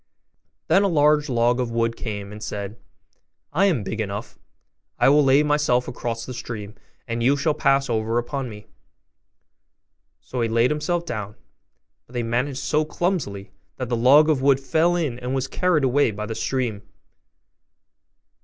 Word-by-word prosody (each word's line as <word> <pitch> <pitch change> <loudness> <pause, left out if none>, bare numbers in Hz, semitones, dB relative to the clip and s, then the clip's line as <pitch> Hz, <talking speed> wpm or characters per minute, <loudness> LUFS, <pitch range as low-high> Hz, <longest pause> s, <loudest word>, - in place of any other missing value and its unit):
Then 180 +5 +4
a 200 - +3
large 150 -3 +3
log 120 0 +2
of 125 -2 -1
wood 115 0 0
came 100 -4 -6
and 105 0 -10
said, 100 0 -5 0.8
'I 190 +6 +3
am 150 - +1
big 110 +3 -3
enough; 100 0 -6 0.6
I - - +4
will 145 +1 +5
lay 135 +2 +5
myself 150 -4 +1
across 115 -2 -4
the 130 - -7
stream, 105 -4 -7 0.3
and 115 0 -3
you 135 +4 +3
shall 150 +2 +1
pass 135 -2 +2
over 115 -1 -1
upon 130 +2 -3
me.' 105 -1 -11 1.5
So 125 - -5
he 115 - 0
laid 115 +3 +2
himself 170 +3 -1
down; 105 -6 -5 0.7
but 120 - -19
they 120 -1 -1
managed 125 +4 -1
so 150 +2 +1
clumsily, 155 - -3 0.3
that 130 -2 -4
the 120 - +1
log 135 +6 +6
of 150 -4 +2
wood 135 -1 +4
fell 160 +5 +2
in 145 -9 -2
and 125 +1 -3
was 135 0 -1
carried 175 0 +1
away 135 +1 +3
by 105 0 -5
the 110 - -4
stream. 120 -4 -2
125 Hz, 165 wpm, -23 LUFS, 115-150 Hz, 1.5 s, log